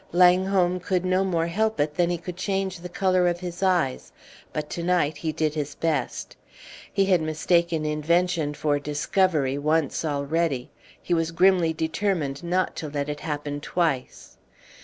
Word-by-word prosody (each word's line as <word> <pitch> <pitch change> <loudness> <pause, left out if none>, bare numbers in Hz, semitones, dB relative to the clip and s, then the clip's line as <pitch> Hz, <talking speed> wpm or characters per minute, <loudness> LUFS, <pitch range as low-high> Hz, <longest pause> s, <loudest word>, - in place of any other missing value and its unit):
Langholm 180 0 +4
could 180 0 -1
no 185 +1 +2
more 170 -4 0
help 220 +6 0
it 150 +1 +1
than 175 +2 +1
he 175 - 0
could 175 +1 -7
change 190 -1 -2
the 180 +1 -8
color 185 0 +2
of 175 0 0
his 175 0 -6
eyes, 175 -9 +1 0.4
but 150 -1 -3
to 170 - -3
night 170 -4 +1
he 160 +1 -2
did 155 -1 -1
his 150 -1 -4
best. 165 -2 -2 0.6
He 195 -1 +2
had 185 -3 +3
mistaken 160 +1 +1
invention 155 0 +1
for 145 -1 0
discovery 150 -1 0
once 155 +1 0
already. 145 -2 -1 0.3
He 175 - -2
was 165 -1 +1
grimly 175 -1 +3
determined 160 -3 -1
not 180 +2 0
to 155 - -4
let 145 0 -3
it 150 0 -4
happen 145 -2 -4
twice. 155 -6 -2
170 Hz, 160 wpm, -25 LUFS, 150-180 Hz, 0.6 s, Langholm